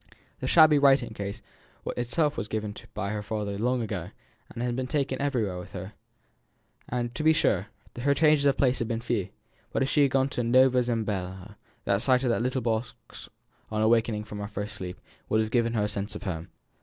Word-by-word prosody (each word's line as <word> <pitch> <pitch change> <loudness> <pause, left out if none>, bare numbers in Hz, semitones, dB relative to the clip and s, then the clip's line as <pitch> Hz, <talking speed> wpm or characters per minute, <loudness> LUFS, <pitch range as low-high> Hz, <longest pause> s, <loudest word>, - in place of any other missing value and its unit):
The 130 - -3
shabby 155 0 +7
writing 135 -4 +4
case 100 +1 -6 0.4
itself 145 +5 0
was 105 - -3
given 105 -1 -3
her - - -15
by 100 -1 -2
her 105 -1 -2
father 105 -1 -3
long 125 +1 +1
ago, 95 -5 -4 0.4
and 120 - -5
had 125 - 0
since 120 - -2
been 130 0 -2
taken 140 -2 -1
with 105 -11 -2
her 95 +2 -7 1.1
everywhere. 120 0 -1
To 155 - -3
be 160 0 +6
sure, - - +2 0.3
her 140 +3 +2
changes 150 -2 +4
of 135 - +3
place 130 -2 +2
had 115 - -1
been 115 -1 -1
but 115 - -8
few; 115 -6 -1 0.4
but - - +1
if 135 - -1
she 150 - +3
had 140 - +5
gone 135 +1 +2
to 125 - -2
Nova 130 +2 +5
Zembla, 105 -4 -3 0.3
the 100 0 +2
sight 130 +3 +3
of 125 - +2
that 115 - +1
little 125 +1 -1
leather 110 -2 +1
box 115 0 -13 0.4
on 110 0 0
awaking 110 -1 +2
from 105 -1 -8
her 100 - -4
first 105 +1 -5
sleep, 90 -3 -7 0.3
would 110 - +3
have 110 0 0
given 115 -2 +2
her 110 -3 +1
a - - +1
sense 100 +1 -4
of - - -7
home. 85 -4 -4
115 Hz, 220 wpm, -27 LUFS, 105-130 Hz, 1.1 s, shabby